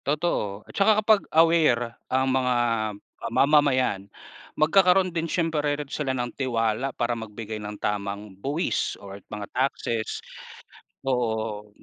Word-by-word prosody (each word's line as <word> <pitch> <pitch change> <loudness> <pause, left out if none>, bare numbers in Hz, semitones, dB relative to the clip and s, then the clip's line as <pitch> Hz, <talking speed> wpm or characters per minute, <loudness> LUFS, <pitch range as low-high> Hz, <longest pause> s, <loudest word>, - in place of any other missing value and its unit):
Totoo 140 - -1
at - - -14
tsaka 210 +1 +4
kapag 215 -2 +5
aware 155 -8 +4 0.2
ang 130 +1 +2
mga, 125 -1 +2 0.7
ah, - - -3
mamamayan 130 -6 +3 0.5
magkakaroon 185 +3 +4
din 165 -1 -2
siyempre 165 -3 0 0.2
rin 150 -1 -5
sila 140 -1 -2
ng 120 -1 -3
tiwala 120 -1 0
para 120 0 0
magbigay 110 -1 -6
ng 105 0 -6
tamang 100 0 -3
buwis 145 - -1
or 100 0 -10
mga 105 -1 -5
taxes. 120 -3 -1 0.9
Oo, 110 -4 -1
125 Hz, 125 wpm, -25 LUFS, 110-155 Hz, 0.9 s, kapag